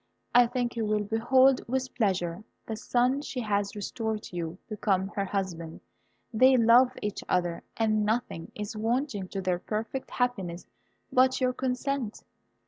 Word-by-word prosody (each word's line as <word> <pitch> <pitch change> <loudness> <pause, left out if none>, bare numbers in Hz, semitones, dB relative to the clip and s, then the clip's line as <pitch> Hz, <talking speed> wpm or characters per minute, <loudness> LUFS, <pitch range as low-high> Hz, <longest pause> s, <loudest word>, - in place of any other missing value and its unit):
I 245 0 +7
think 245 0 -2
you 230 - -1
will 210 -1 +1
behold 250 +5 +4
with 260 +1 -2
pleasure 190 -5 0 0.2
the 220 - -4
son 250 +5 +1
she 275 -3 -5
has 205 -2 -1
restored 215 +1 -3
to - - -10
you 170 0 -4
become 195 -3 0
her 200 -1 -2
husband. 175 -5 -4 0.5
They 255 +4 +6
love 245 +2 +5
each 205 -1 -3
other, 175 -2 0 0.2
and 215 -1 +2
nothing 215 -6 -2
is 210 +1 -5
wanting 225 -2 -1
to 195 +1 -4
their 180 -1 0
perfect 220 +7 -4
happiness 195 -9 -2 0.5
but 260 0 +4
your 255 -1 +2
consent. 255 -2 -2
220 Hz, 150 wpm, -28 LUFS, 195-250 Hz, 0.5 s, I